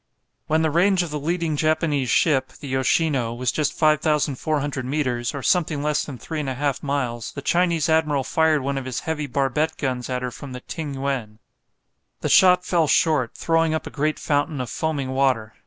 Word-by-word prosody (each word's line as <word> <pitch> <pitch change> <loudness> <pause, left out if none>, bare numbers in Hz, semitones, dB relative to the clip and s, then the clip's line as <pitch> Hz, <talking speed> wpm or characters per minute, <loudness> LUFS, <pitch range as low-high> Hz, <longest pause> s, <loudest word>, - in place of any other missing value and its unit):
When 160 +1 +2
the 160 - +1
range 180 +3 +3
of 170 - -6
the 150 - -3
leading 165 +1 -1
Japanese 155 -3 +1
ship 135 0 +2
the 145 - -10
"Yoshino" 130 -2 +1
was 125 0 0
just 150 -2 0
5400 150 -2 +1
metres, 125 -2 -1
or 140 - -5
something 155 -5 +1
less 150 0 +1
than 140 -4 -7
3 155 +6 -4
1/2 140 0 -2
miles, 125 -5 -3
the 140 - -7
Chinese 170 -2 +2
admiral 155 -4 +2
fired 155 0 +2
one 140 0 -1
of 130 - -8
his 130 -2 -3
heavy 150 -2 -3
barbette 140 +4 0
guns 130 -3 -3
at 125 0 -2
her 125 - -3
from 135 +1 -9
the 125 - -7
"Ting 150 -1 -6
yuen." 135 -6 -3 0.8
The - - -1
shot 180 -1 +6
fell 170 -4 +2
short, 145 -4 +2
throwing 165 -1 +1
up 160 - -3
a - - -7
great 155 +1 -1
fountain 145 0 -1
of 125 -3 -4
foaming 145 -2 -2
water. 130 -5 +1
145 Hz, 190 wpm, -23 LUFS, 130-160 Hz, 0.8 s, shot